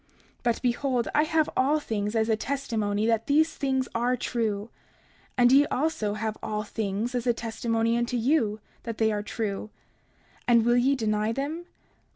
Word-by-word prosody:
30:41 - - -34
But, 240 -1 0
behold, 245 0 0
I 300 - +4
have 315 -1 +2
all 285 +4 +3
things 210 -5 -3
as 220 0 +2
a 220 - +3
testimony 220 -5 -1
that 225 -1 +1
these 315 +3 +3
things 265 -2 0
are 245 +2 +1
true; 220 -3 -2 0.7
and 245 0 +5
ye 285 +2 +6
also 250 -8 -1
have 215 0 -3
all 210 0 -2
things 215 +2 -3
as 245 0 -2
a 240 - +4
testimony 230 0 -1
unto 240 +1 0
you 230 -4 +1 0.2
that 230 -2 -5
they 220 -1 +2
are 210 -1 -1
true; 210 -1 -4 0.8
and 235 -2 +5
will 240 0 +4
ye 265 +3 +3
deny 215 -2 0
them? 300 +8 -4
235 Hz, 175 wpm, -27 LUFS, 220-260 Hz, 0.8 s, ye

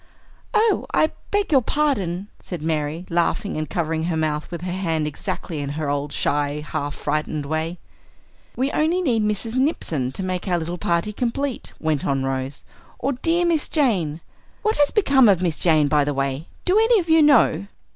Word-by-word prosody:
"Oh, 435 0 +3
I 310 - +3 0.2
beg 410 -3 0
your 270 -3 +6
pardon," 205 - 0
said 175 -4 -6
Mary, 155 +1 -2
laughing 175 +4 0
and 155 -2 -3
covering 160 -1 -1
her 170 -2 -1
mouth 155 -1 -1
with 170 -2 -6
her 180 0 -3
hand 165 -4 -1
exactly 150 +1 -4
in 140 -1 -3
her 150 -2 -1
old, 145 0 -2
shy, 145 +1 -1
half 145 0 -3
frightened 150 0 -2
way. 160 +4 -2 0.8
"We 265 +3 0
only 335 +4 +1
need 235 -8 +2
Mrs. 210 +3 -1
Nipson 160 - 0
to 190 - -3
make 185 +1 -3
our 180 -2 +2
little 170 +1 -4
party 170 +6 0
complete," 250 +4 -2
went 155 -3 0
on 135 -1 0
Rose, 135 +1 -3 0.3
"or 275 - -1
dear 335 +7 +1
Miss 330 -3 +1
Jane! 185 - +1 0.4
What 435 0 +1
has 290 -1 +4
become 275 - +4
of 190 -4 +4
Miss 170 -4 0
Jane, 155 -4 +4
by 150 0 +3
the 145 0 -2
way? 135 +3 -2 0.2
Do 375 +4 +4
any 450 0 +5
of 345 - -3
you 320 0 +5
know?" 230 - +4
175 Hz, 185 wpm, -22 LUFS, -, 0.8 s, your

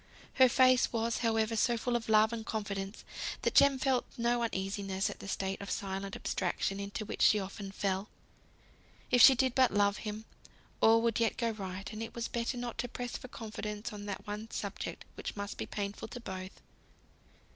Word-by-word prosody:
Her 260 - +9
face 255 0 +5
was, 230 0 0
however, 225 -1 +1
so 235 +2 +2
full 240 +2 -1
of 230 -2 -2
love 220 +1 +5
and 225 -1 -3
confidence, 200 -2 -4 0.4
that - - +1
Jem 280 -1 +6
felt 260 -1 +2
no 240 0 +1
uneasiness 195 -3 -1
at - - -10
the - - -8
state 195 0 -2
of 200 - -6
silent 195 0 -3
abstraction 195 +1 -1
into 200 +2 -4
which - - -5
she 215 - +6
often 195 0 -6
fell. 195 0 -1 1.0
If 245 -1 +6
she 265 - +10
did 260 0 +2
but 260 -1 +5
love 205 0 +3
him, 215 0 -5 0.6
all 225 +1 +6
would 230 -1 +1
yet 230 -1 +1
go 230 -2 +1
right; 195 0 -6
and 215 - -5
it 225 - -6
was 235 -1 -2
better 235 +1 -2
not 240 -1 -5
to 245 - -1
press 245 0 -5
for - - -6
confidence 215 -2 -6
on 205 0 -7
that 200 - -5
one 210 +2 -5
subject - - -5
which - - -6
must 205 0 -5
be - - -3
painful 200 0 -4
to 245 - -8
both. 190 -3 -7
220 Hz, 190 wpm, -32 LUFS, 200-235 Hz, 1.0 s, she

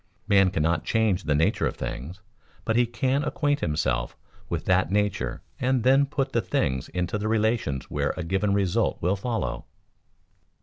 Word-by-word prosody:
Man 100 -3 +5
cannot 80 -2 0
change 110 -5 +1
the 75 - +2
nature 80 +3 +2
of - - -4
things; 80 +11 -6 0.4
but 110 - +1
he 120 0 +3
can 130 +4 0
acquaint 145 -1 0
himself 65 - -1 0.3
with - - -3
that - - +3
nature 105 -1 -1 0.2
and 130 -2 +1
then 135 +3 +4
put 140 -1 -2
the - - +1
things 65 -1 -1
into 90 +3 -2
the 105 - -2
relations 110 - 0
where - - -1
a 90 - -3
given 95 +4 0
result 100 -3 +1
will 90 +3 +2
follow. 115 +3 -3
100 Hz, 165 wpm, -26 LUFS, 85-120 Hz, 0.4 s, Man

